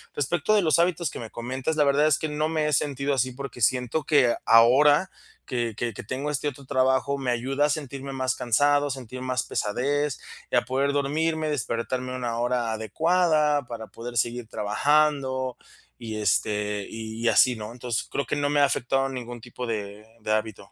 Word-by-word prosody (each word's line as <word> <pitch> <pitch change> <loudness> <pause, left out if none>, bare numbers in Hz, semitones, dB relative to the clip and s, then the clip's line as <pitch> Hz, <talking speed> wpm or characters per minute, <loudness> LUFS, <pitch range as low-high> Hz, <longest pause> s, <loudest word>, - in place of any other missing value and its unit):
Respecto 155 +7 0
de 210 - +4
los 160 0 +3
hábitos 170 -2 +1
que - - -8
me 115 - -7
comentas, 130 +6 -3
la 150 - +5
verdad 140 +2 +3
es 155 -1 +3
que 155 - -2
no 150 +1 -1
me 155 -2 0
he - - 0
sentido 140 0 0
así 130 -1 0
porque 140 -1 -8
siento 125 +6 +1
que 135 -6 +4
ahora 140 +9 +6 0.4
que 120 -3 -2
que 120 -1 -2
que - - -8
tengo 135 +7 -3
este 150 0 -2
otro 140 0 -13
trabajo, 130 +1 +1
me 130 -2 -1
ayuda 135 +4 0
a - - -5
sentirme 140 -2 -4
más 130 -1 -1
cansado, 145 +4 +2
sentir 130 -2 -6
más 130 -1 -1
pesadez 140 +6 -1 0.3
y - - +1
a - - +5
poder 135 +2 0
dormirme, 155 +3 0
despertarme 125 -1 -2
a - - -4
una 120 -2 -3
hora 120 -1 0
adecuada 150 - +1
para 115 -2 -7
poder 120 +1 -8
seguir 120 +1 -1
trabajando 130 +3 +1 0.4
y 115 -2 -6
este, 105 0 0
y 110 +1 -4
así, 125 -2 +4
¿no? 110 +1 -7
Entonces 120 -2 -3
creo 140 - -2
que - - -1
no 145 0 0
me 145 0 +3
ha - - +7
afectado 135 0 0
ningún 120 -2 -7
tipo 125 +1 -7
de 105 -1 -5 0.2
de 110 - -3
hábito. 110 -1 -3
130 Hz, 190 wpm, -25 LUFS, 120-145 Hz, 0.4 s, ha